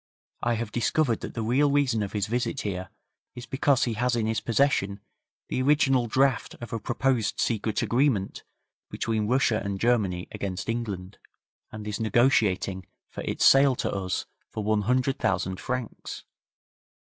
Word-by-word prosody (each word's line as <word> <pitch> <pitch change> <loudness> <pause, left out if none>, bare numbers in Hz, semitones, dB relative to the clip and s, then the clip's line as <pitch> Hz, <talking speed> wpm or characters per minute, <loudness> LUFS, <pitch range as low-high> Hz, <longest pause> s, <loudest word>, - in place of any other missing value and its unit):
I 120 0 +1
have 115 -1 -4
discovered 120 +1 +1
that - - -7
the 115 - -2
reason 135 -1 +2
of 100 0 -4
his 105 -2 0
visit 120 +3 -2
here 95 -3 -4 0.5
is 125 - -8
because 135 0 +2
he 120 - 0
has 120 +2 0
in 115 -2 0
his 110 0 -1
possession 115 -5 +1 0.5
the 130 - -1
original 135 -3 +3
draft 130 +1 +1
of 120 -2 -8
a 115 - -1
proposed 120 -1 0
secret 110 -2 0
agreement 120 -6 +1 0.5
between 110 -2 -1
Russia 125 -2 +2
and 100 -1 -3
Germany 100 -7 +1
against 95 +1 -4
England, 105 -5 -4 0.5
and 105 -1 -7
is 105 +1 -3
negotiating 105 -5 +2 0.2
for - - -6
its - - 0
sale 135 -1 +6
to - - -2
us 95 -3 -2 0.2
for 110 - -5
one 105 0 +1
hundred 125 +5 +1
thousand 95 -3 -1
francs. 125 -3 -5
115 Hz, 155 wpm, -26 LUFS, 105-125 Hz, 0.5 s, sale